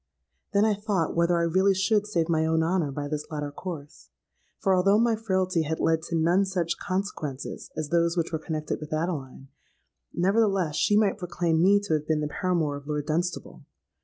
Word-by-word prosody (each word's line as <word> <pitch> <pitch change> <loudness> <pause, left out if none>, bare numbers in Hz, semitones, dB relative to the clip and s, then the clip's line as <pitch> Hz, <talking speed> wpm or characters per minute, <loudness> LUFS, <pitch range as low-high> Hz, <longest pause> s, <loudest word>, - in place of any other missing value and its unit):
Then 200 +1 +3
I 220 - +3
thought 200 -5 -1
whether 170 +1 +3
I 170 - +1
really 190 +4 +3
should 205 +2 +1
save 170 -6 0
my 160 -2 +1
own 160 0 +2
honour 165 -3 0
by 145 +1 -4
this 150 0 -4
latter 150 -2 -4
course; 155 -2 -8 0.5
for, 195 - +1
although 195 +3 +4
my 230 0 +3
frailty 185 -5 0
had 160 +1 -2
led 160 0 +2
to 170 - -1
none 170 +4 +3
such 180 -3 -2
consequences 185 -8 -4
as 155 -2 -3
those 170 +1 +2
which 170 0 0
were 160 - -2
connected 155 -1 -4
with 150 0 -7
Adeline, 150 -5 -4 0.6
nevertheless 195 -3 +1
she 205 - +3
might 210 -1 +2
proclaim 170 -3 0
me 200 +3 +5
to 205 -5 -2
have 150 0 -1
been 155 -1 +1
the 150 - -1
paramour 160 -3 -1
of 140 0 -12
Lord 150 -1 -2
Dunstable. 170 +4 -3
170 Hz, 190 wpm, -26 LUFS, 155-190 Hz, 0.6 s, me